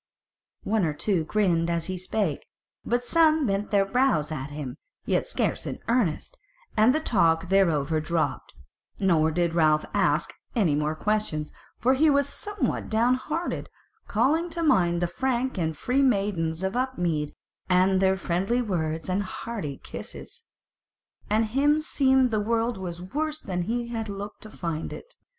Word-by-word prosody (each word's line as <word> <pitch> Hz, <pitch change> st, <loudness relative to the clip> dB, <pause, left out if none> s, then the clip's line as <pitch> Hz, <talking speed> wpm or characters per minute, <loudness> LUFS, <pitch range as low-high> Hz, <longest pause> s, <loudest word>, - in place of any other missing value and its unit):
One 215 Hz, -1 st, +1 dB
or 155 Hz, -3 st, +1 dB
two 180 Hz, -2 st, 0 dB
grinned 170 Hz, -3 st, +1 dB
as 170 Hz, -1 st, -1 dB
he 185 Hz, -, -3 dB
spake, 185 Hz, -3 st, -2 dB, 0.4 s
but 240 Hz, +1 st, 0 dB
some 315 Hz, +1 st, +4 dB
bent 200 Hz, -1 st, -1 dB
their 200 Hz, -1 st, +3 dB
brows 195 Hz, -, +1 dB
at 145 Hz, -2 st, -4 dB
him, 145 Hz, -3 st, -6 dB, 0.3 s
yet -, -, 0 dB
scarce -, -, -1 dB
in -, -, -4 dB
earnest, 235 Hz, -, 0 dB, 0.4 s
and 225 Hz, +5 st, +5 dB
the -, -, +2 dB
talk 170 Hz, -, +2 dB
thereover 160 Hz, -5 st, +2 dB
dropped, 165 Hz, 0 st, -2 dB, 0.4 s
nor 165 Hz, -6 st, +3 dB
did 170 Hz, +1 st, 0 dB
Ralph 155 Hz, -2 st, +3 dB
ask -, -, +1 dB, 0.2 s
any 195 Hz, -10 st, +3 dB
more 150 Hz, +1 st, 0 dB
questions; 185 Hz, -5 st, -1 dB, 0.3 s
for 255 Hz, +3 st, +3 dB
he 305 Hz, +4 st, +4 dB
was 280 Hz, -1 st, +3 dB
somewhat 415 Hz, 0 st, -2 dB
down 230 Hz, +3 st, +3 dB
hearted, 305 Hz, +6 st, -3 dB, 0.4 s
calling 300 Hz, +10 st, +2 dB
to 335 Hz, 0 st, -3 dB
mind 175 Hz, -, +3 dB
the -, -, +2 dB
frank 255 Hz, +3 st, -1 dB
and 160 Hz, -2 st, -1 dB
free 255 Hz, -, +1 dB
maidens 195 Hz, -9 st, +1 dB
of 190 Hz, +3 st, -1 dB
Upmead, 175 Hz, -, -1 dB, 0.3 s
and 185 Hz, +1 st, +4 dB
their 190 Hz, 0 st, +3 dB
friendly 190 Hz, +6 st, 0 dB
words 165 Hz, -8 st, -2 dB
and 185 Hz, +2 st, 0 dB
hearty 190 Hz, -7 st, -5 dB
kisses. 470 Hz, -1 st, -9 dB, 0.8 s
And 215 Hz, +2 st, +3 dB
him 285 Hz, +7 st, +2 dB
seemed 265 Hz, -5 st, +3 dB
the 215 Hz, -, +1 dB
world 230 Hz, 0 st, 0 dB
was 175 Hz, -2 st, -6 dB
worse 305 Hz, +10 st, -2 dB
than 180 Hz, -10 st, -3 dB
he 235 Hz, +5 st, -2 dB
had 225 Hz, -2 st, -4 dB
looked 200 Hz, +1 st, -7 dB
to 215 Hz, -, -10 dB
find 165 Hz, -5 st, -4 dB
it. -, -, -10 dB
200 Hz, 160 wpm, -26 LUFS, 165-250 Hz, 0.8 s, and